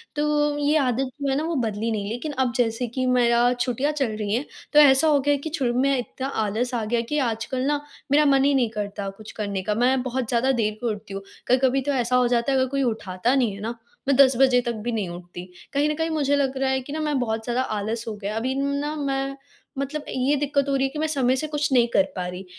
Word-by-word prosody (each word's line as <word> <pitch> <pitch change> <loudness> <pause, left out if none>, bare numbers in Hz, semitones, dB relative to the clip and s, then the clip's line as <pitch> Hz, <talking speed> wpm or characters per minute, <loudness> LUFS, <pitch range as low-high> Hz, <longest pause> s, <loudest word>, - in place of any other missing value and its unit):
तो 295 0 +1
ये 290 +1 +1
आदत 260 -1 0
जो 280 - 0
है 270 - +1
ना 305 - -1
वो 330 0 -2
बदली 225 -2 -1
नहीं 205 -1 -2
लेकिन 245 +7 -4
अब 250 -2 +1
जैसे 240 0 0
कि 255 +3 -2
मेरा 245 -1 +3
छुट्टियाँ 250 +4 -1
चल 270 -7 -1
रही 210 -1 -2
हैं 255 +6 0 0.3
तो 300 - +7
ऐसा 285 +1 +6
हो 295 -2 +4
गया 290 +1 +2
कि - - -2
शुरू 245 -4 0
में 275 0 +2
इतना 260 +3 -4 0.2
आलस 240 +5 -2
आ 230 - -1
गया 235 +2 0
कि 300 - 0
आजकल 225 +3 -3
ना 290 0 0 0.3
मेरा 300 +1 +5
मन 275 -1 +4
ही 285 - +3
नहीं 250 -4 +2
करता 205 -2 -4
कुछ 215 +2 -11
करने 200 -3 -3
का। 210 +3 0
मैं 255 +3 +2
बहुत 255 -2 -2
ज़्यादा 250 +2 +2
देर 215 -4 0
को 245 - -1
उठती 205 -1 -6
हूँ। 195 - -4 0.3
कभी-कभी 260 +1 +3
तो 285 +2 -1
ऐसा 250 -1 +1
हो 250 -1 +4
जाता 240 +2 +1
है, 270 - +2
अगर 260 - +2
कोई 275 +1 0
उठाता 220 0 0
नहीं 245 -6 +2
है - - -10
ना 230 +2 -4 0.3
मैं 275 - +4
10 270 -2 +6
बजे 260 -1 +5
तक 235 -1 -2
भी 240 - 0
नहीं 210 -6 -2
उठती। 175 0 -8 0.3
कहीं 285 +2 +2
न - - +1
कहीं 320 +1 -1
मुझे 285 -3 +1
लग 275 -2 0
रहा 265 0 +1
है 265 0 0
कि 280 +3 -8
ना 315 - -3
मैं 300 -2 0
बहुत 225 -2 -2
ज़्यादा 240 +2 0
आलस 220 +3 -3
हो 225 - -3
गया। 205 +1 -5
अभी 255 +4 -1
ना 280 +2 -1
मैं 275 -2 -2 0.4
मतलब 285 +2 -3
ये 260 +3 +1
दिक़्क़त 280 -1 0
हो 275 - +1
रही 270 - +1
है - - -6
कि 300 - -6
मैं 315 - +1
समय 265 -4 +2
से 310 +4 -2
कुछ 295 -1 -1
नहीं 240 -2 +5
कर 195 - +5
पा 180 - -3
रही। 180 +1 -7
255 Hz, 265 wpm, -24 LUFS, 225-280 Hz, 0.4 s, तो